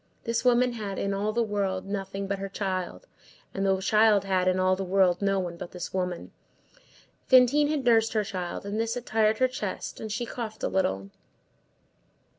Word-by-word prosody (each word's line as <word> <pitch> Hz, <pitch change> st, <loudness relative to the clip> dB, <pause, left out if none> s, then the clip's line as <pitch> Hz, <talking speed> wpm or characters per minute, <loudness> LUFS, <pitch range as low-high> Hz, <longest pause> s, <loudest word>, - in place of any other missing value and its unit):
This 230 Hz, 0 st, -1 dB
woman 250 Hz, 0 st, +4 dB
had, 205 Hz, -4 st, -5 dB
in 200 Hz, 0 st, -1 dB
all 205 Hz, +2 st, -1 dB
the 235 Hz, +2 st, +1 dB
world, 200 Hz, -3 st, -2 dB
nothing 195 Hz, 0 st, -4 dB
but 195 Hz, 0 st, -3 dB
her 195 Hz, 0 st, -4 dB
child, 190 Hz, -, -4 dB, 0.5 s
and 195 Hz, -, -2 dB
the 190 Hz, -1 st, +2 dB
child 210 Hz, 0 st, +4 dB
had, 185 Hz, -1 st, +1 dB
in 185 Hz, 0 st, +2 dB
all 185 Hz, 0 st, +3 dB
the 195 Hz, -, -4 dB
world, 185 Hz, -1 st, +2 dB
no 195 Hz, -1 st, +1 dB
one 175 Hz, -2 st, -4 dB
but 175 Hz, -, -7 dB
this 180 Hz, -2 st, -6 dB
woman. 180 Hz, -2 st, -3 dB, 1.0 s
Fantine 260 Hz, +3 st, +5 dB
had 295 Hz, -4 st, -1 dB
nursed 225 Hz, -2 st, +4 dB
her 215 Hz, -1 st, +1 dB
child, 185 Hz, -2 st, -5 dB
and 205 Hz, +2 st, -3 dB
this 225 Hz, 0 st, -1 dB
had 245 Hz, -1 st, -6 dB
tired 215 Hz, 0 st, +2 dB
her 255 Hz, -, +3 dB
chest, 215 Hz, -6 st, -5 dB
and 220 Hz, -, -6 dB
she 225 Hz, +4 st, -2 dB
coughed 225 Hz, -2 st, -6 dB
a -, -, +2 dB
little. 95 Hz, -, -1 dB
200 Hz, 195 wpm, -27 LUFS, 190-225 Hz, 1.0 s, Fantine